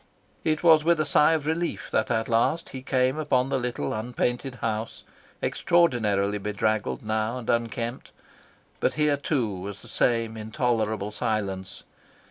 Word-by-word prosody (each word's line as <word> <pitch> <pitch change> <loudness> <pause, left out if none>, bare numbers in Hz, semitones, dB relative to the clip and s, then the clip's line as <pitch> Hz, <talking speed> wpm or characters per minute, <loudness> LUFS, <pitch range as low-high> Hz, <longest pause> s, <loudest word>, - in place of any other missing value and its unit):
It 155 0 0
was 160 -3 +7
with 170 0 +3
a 155 - +2
sigh 150 +2 +4
of 155 -3 -1
relief 160 - -2
that 110 - +1
at 110 0 0
last 120 +8 +1
he 130 - -7
came 130 +2 +1
upon 135 -4 +1
the 135 - +1
little 125 -1 -2
unpainted 120 +3 -2
house, 115 -2 -3 0.4
extraordinarily 105 - +2
bedraggled 105 - -1
now, 110 +2 -1
and 125 - -8
unkempt; 115 +1 -2 0.7
but - - +1
here 150 -1 +2
too 140 -4 0
was 100 0 -6
the - - -12
same 115 -2 0
intolerable 110 -2 -1
silence. 100 -3 -3
115 Hz, 145 wpm, -26 LUFS, 110-140 Hz, 0.7 s, was